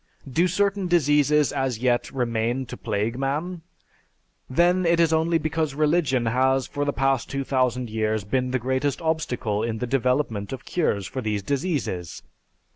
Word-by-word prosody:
Do 165 +7 +2
certain 200 +1 0
diseases 150 -3 +3
as 135 -4 -1
yet 120 +1 +1
remain 120 0 -1
to - - -8
plague 110 +3 -2
man? 155 +6 -2 0.9
Then 175 +7 +3
it 170 -1 +3
is 165 -1 +4
only 165 +1 +2
because 155 -2 -2
religion 150 -5 +2
has 130 +3 +2
for 145 0 -3
the 145 - +1
past 135 -2 0
2000 130 -2 0
years 110 -1 -1
been 125 +5 -1
the 130 - +1
greatest 130 +2 -1
obstacle 125 -10 -1
in 115 0 -2
the 125 - -2
development 125 -5 0
of 130 - -7
cures 105 - 0
for 100 +7 -5
these 105 -3 -2
diseases. 140 - -2
135 Hz, 155 wpm, -24 LUFS, 120-155 Hz, 0.9 s, is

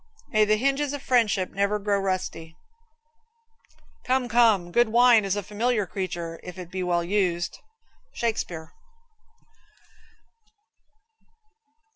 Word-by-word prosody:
May 215 0 +3
the 215 +1 +2
hinges 275 +4 0
of 285 - -6
friendship 215 -7 +1
never 200 +2 0
grow 200 -1 0
rusty. 185 -4 -3 1.5
Come, 255 0 0
come, 225 -7 +3
good 240 +3 +3
wine 235 -1 +5
is 195 0 -1
a 205 - -2
good - - -17
familiar 220 0 0
creature, 175 -3 -5
if 180 +1 -10
it 180 -1 -9
be 190 - -4
well 175 -1 0
used. 175 -2 -1 0.5
Shakespeare. 180 - -3
205 Hz, 115 wpm, -25 LUFS, 180-235 Hz, 1.5 s, wine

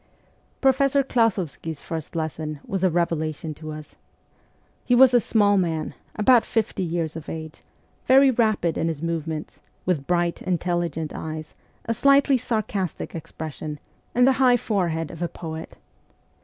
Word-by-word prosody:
Professor 275 +1 +3
Klasovsky's 190 - 0
first 160 0 -6
lesson 155 -1 -3
was 190 -1 -3
a 185 - +5
revelation 160 -2 -1
to 155 +1 -8
us. 155 -1 -10 0.9
He 245 - +3
was 260 0 +7
a 245 - +7
small 205 -3 +3
man, 165 -4 -1 0.2
about 235 +2 +5
fifty 220 -3 -1
years 165 -3 -2
of 160 -2 -7
age, 160 -1 -7 0.5
very 270 +1 +7
rapid 215 -8 +1
in 165 - 0
his 160 -2 -3
movements, 160 -2 -4 0.3
with 160 -7 0
bright, 175 -1 0
intelligent 175 -3 -1
eyes, 155 0 -6 0.3
a 230 - 0
slightly 275 +3 +4
sarcastic 215 -6 -2
expression, 155 -2 -6 0.4
and 245 0 +5
the 270 - +6
high 250 -2 +6
forehead 170 -8 -1
of 165 - -10
a 175 - +1
poet. 160 -1 -8
175 Hz, 140 wpm, -24 LUFS, 160-225 Hz, 0.9 s, was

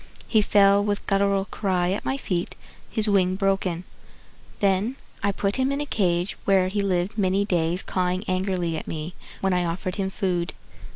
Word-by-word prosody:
He 220 - +4
fell 200 -1 +5
with 205 0 -1
guttural 195 -1 +2
cry 185 -4 0
At 195 - -2
my 265 - -1
feet, 180 -9 -2 0.3
his 220 -1 0
wing 185 -2 +3
broken. 195 -3 0 0.8
Then 200 +5 +2 0.3
I 200 - +2
put 200 +2 -1
him 260 +1 +1
in 280 - -1
a 295 - -1
cage 180 -7 0
Where 190 -2 +4
he 205 +2 0
lived 190 +2 0
many 195 +1 +2
days 175 -1 0
cawing 185 +1 -1
angrily 185 -3 0
at - - -7
me 160 +2 -5 0.3
When 190 -1 +2
I 180 0 +2
offered 175 +2 -3
him 195 -1 -1
food. 180 -2 -1
190 Hz, 175 wpm, -25 LUFS, 180-200 Hz, 0.8 s, fell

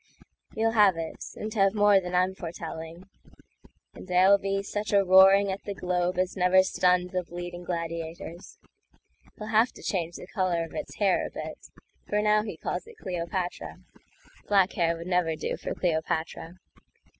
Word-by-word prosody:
You'll 225 +1 +1
have 205 -6 +4
it, 165 -1 -6
and 215 0 -5
have 195 -1 +2
more 205 -2 +5
than 180 0 -4
I'm 185 +1 +2
foretelling; 165 -1 -7 0.9
And - - -12
there'll 190 +2 +5
be 195 0 -2
such 210 +1 -4
a 200 -1 +4
roaring 195 +1 +6
at 190 - -5
the 200 - -5
GlobeAs 180 0 -1
never 185 0 +4
stunned 180 -1 +1
the 185 - -1
bleeding 175 0 -7
gladiators. 170 0 -6 0.8
He'll 215 0 -7
have 220 +3 +3
to - - -14
change 170 -4 -2
the - - -8
color 180 -3 -1
of 165 - -9
its - - -6
hairA 200 -3 +1
bit, - - -7 0.5
for 210 - +1
now 210 0 +3
he 210 -1 -6
calls - - -4
it 465 - -14
Cleopatra.Black 185 +2 -3
hair 170 -2 +1
would 170 - -8
never 180 -3 +1
do - - -3
for - - -5
Cleopatra. 165 0 -2
185 Hz, 155 wpm, -27 LUFS, 170-200 Hz, 0.9 s, roaring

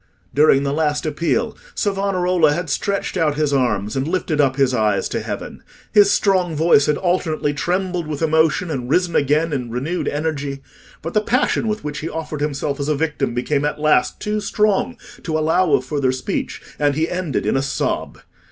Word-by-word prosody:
During 145 -2 +4
the 140 0 -1
last 150 -1 0
appeal, 170 +9 -1 0.2
Savonarola 185 -5 +1
had 165 -1 -3
stretched 200 +4 -1
out 155 -4 +1
his 150 -1 0
arms 105 -6 0
and 135 +2 -1
lifted 165 -3 0
up 135 -2 +2
his 135 -2 +2
eyes 105 -4 +1
to - - -2
heaven; - - -6 0.3
his 205 -2 +6
strong 185 -5 +2
voice 155 -2 +4
had 150 - +2
alternately 165 -5 0
trembled 180 +2 -1
with 155 0 -3
emotion 160 +2 +2
and 125 -4 -4
risen 175 +3 +1
again 150 +3 +2
in 125 -4 -3
renewed 135 +10 -3
energy; 145 -2 -3 0.4
but 165 - -4
the 210 - +3
passion 235 0 +1
with 215 0 -2
which 150 0 -4
he 160 - -4
offered 155 -2 -5
himself 145 -1 -2
as 140 - -2
a 150 - +2
victim 150 -5 -1
became 140 +4 0
at 150 0 -1
last 150 -5 +2
too 210 0 -2
strong 210 +4 0 0.2
to 160 -2 -2
allow 160 +2 +2
of 130 - +2
further 135 -1 0
speech, 130 0 -4 0.2
and 145 -1 +2
he 160 +2 +1
ended 180 -5 -2
in - - +1
a 135 - +2
sob. 135 - -2
155 Hz, 190 wpm, -20 LUFS, 140-180 Hz, 0.4 s, his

